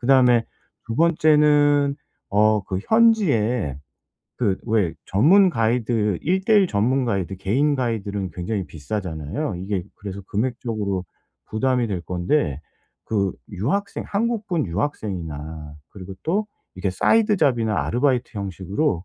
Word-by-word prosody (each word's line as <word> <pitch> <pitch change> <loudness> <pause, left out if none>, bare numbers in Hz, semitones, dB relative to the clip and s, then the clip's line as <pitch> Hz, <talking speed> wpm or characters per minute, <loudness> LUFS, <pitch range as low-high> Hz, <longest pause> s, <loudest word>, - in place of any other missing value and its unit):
그다음에 125 -2 +4 0.4
2 115 - -4
번째는 150 -2 +4 0.3
어 105 0 +3
그 95 - -1
현지에 125 - +3 0.6
그 100 -6 +1
왜 105 -7 +1
전문 180 - +5
가이드 115 - 0
1:1 190 +4 +3
전문 130 - +1
가이드 95 -5 -2
개인 135 +10 +1
가이드들은 105 -6 -2
굉장히 95 +3 -3
비싸잖아요. 90 - -4
이게 95 0 -3
그래서 100 -1 -7
금액적으로 110 -4 -2 0.5
부담이 125 +1 +1
될 95 -4 -2
건데 90 - -1 0.5
그 100 -4 0 0.2
유학생 145 - -2
한국분 210 -5 -1
유학생이나 80 - -4 0.2
그리고 95 -1 -9
또 205 +6 0 0.3
이게 95 +1 -2
사이드 210 - +3
잡이나 115 - +1
아르바이트 125 0 +1
형식으로 95 - -2
110 Hz, 275 characters per minute, -22 LUFS, 95-145 Hz, 0.6 s, 전문